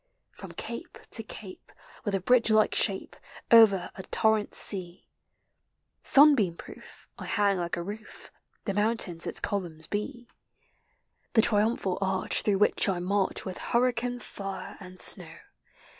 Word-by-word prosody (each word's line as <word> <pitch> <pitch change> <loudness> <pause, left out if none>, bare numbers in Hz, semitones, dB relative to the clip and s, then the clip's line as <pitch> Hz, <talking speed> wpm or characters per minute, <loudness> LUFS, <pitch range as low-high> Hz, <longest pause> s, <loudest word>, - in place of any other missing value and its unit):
From - - -10
cape - - -7
to 225 - 0
cape, 210 -3 -11 0.3
with 205 - 0
a - - 0
bridge 235 +4 +3
like 215 0 +4
shape, 195 -3 -2 0.4
Over 210 -6 +6
a - - -8
torrent 220 +2 0
sea, 185 -3 -2 1.0
Sunbeam 270 - +6
proof, - - -13
I - - -7
hang 200 -3 +1
like 170 -1 -3
a 170 - -3
roof, 210 +3 -9 0.3
The 200 - -1
mountains 205 -5 -1
its - - -3
columns 170 -6 -4
be. 240 +4 -5 1.1
The 225 - +5
triumphal 210 -4 +2
arch 190 -1 0
through 205 -2 +1
which 205 0 +3
I 190 - 0
march 190 +2 -1
With 185 - -5
hurricane, 245 0 0
fire, 195 -1 -7
and 185 -1 -12
snow. - - -2
205 Hz, 140 wpm, -28 LUFS, 185-225 Hz, 1.1 s, Over